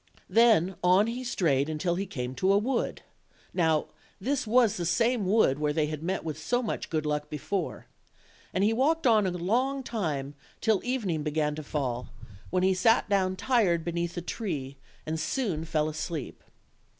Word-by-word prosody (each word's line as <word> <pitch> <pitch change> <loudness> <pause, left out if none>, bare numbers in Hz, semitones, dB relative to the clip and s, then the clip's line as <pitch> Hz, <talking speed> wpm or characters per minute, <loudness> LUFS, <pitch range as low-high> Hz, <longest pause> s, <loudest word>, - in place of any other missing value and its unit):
Then 215 -6 +4
on 185 +3 +5
he 240 +3 -4
strayed 155 - 0
till 175 +1 +1
he 195 +3 -2
came 125 -6 -4
to 185 +9 +1
a 200 - +5
wood 235 +4 -1 0.5
(now 160 -4 +1 0.3
this 260 +3 -1
was 225 -2 +4
the 175 - -3
same 230 +4 +1
wood 185 -9 +3
where 150 -1 0
they 155 -1 +1
had 155 0 -5
met 185 +4 -2
with 155 -1 -5
so 245 +9 0
much 220 - -3
good 155 -2 -1
luck 150 0 -2
be 150 - -4
fore); 185 +3 -3 0.7
and 185 - 0
he 215 +2 +3
walked 305 +6 +1
on 215 -5 +5
a - - 0
long 245 +10 0
time 150 - -3 0.3
till 220 -3 +2
evening 215 -11 -1
began 150 0 0
to 155 - -5
fall, 130 -5 -3 0.4
when 185 0 +1
he 190 0 +4
sat 225 +4 +3
down 190 -2 +2
tired 190 -8 +2
beneath 170 0 -2
a - - -1
tree, 150 - -4 0.3
and 160 +1 -2
soon 175 - -1
fell 155 -2 0
asleep. 155 -2 -5
180 Hz, 180 wpm, -28 LUFS, 155-225 Hz, 0.7 s, on